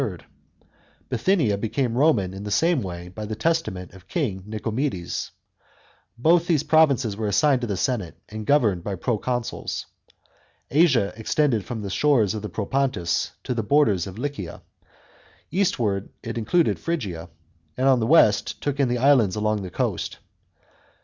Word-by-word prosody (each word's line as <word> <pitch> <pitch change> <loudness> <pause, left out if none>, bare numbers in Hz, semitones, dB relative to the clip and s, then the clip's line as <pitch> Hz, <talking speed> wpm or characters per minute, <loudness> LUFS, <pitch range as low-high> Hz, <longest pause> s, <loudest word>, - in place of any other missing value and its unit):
Bithynia 140 - +1
became 120 +2 -1
Roman 120 - +2
in 95 +1 -7
the 105 - -5
same 165 +6 +2
way 90 -3 -6
by 95 +5 -8
the 110 +1 -4
testament 110 - -1
of 95 -2 -16
King 115 - -2
Nicomedes. 110 -2 -3 0.9
Both 170 +7 +3
these 155 -4 +2
provinces 140 -10 +3
were 110 0 -2
assigned 125 +6 +3
to 120 - -2
the 100 -3 -2
senate 105 -5 -2
and 110 0 -7
governed 110 - +3
by 100 0 -3
proconsuls. 120 +4 -2 0.9
Asia 135 - +3
extended 115 0 0
from 115 -4 -5
the 100 - -4
shores 120 -6 +3
of 110 - -4
the 105 - -5
Propontis 100 -3 -1
to - - -2
the 115 - -1
borders 105 - +2
of 95 +1 -9
Lycia; 125 - -5 0.9
eastward 115 - 0
it 115 - -5
included 120 +10 +1
Phrygia, 95 - -4 0.5
and 130 +1 +1
on 130 -2 +5
the 110 - 0
west 105 -9 +4
took 145 -1 -3
in 140 - +3
the 120 0 0
islands 125 -7 +4
along 105 0 0
the 95 - -6
coast. - - -2
115 Hz, 150 wpm, -24 LUFS, 100-140 Hz, 0.9 s, on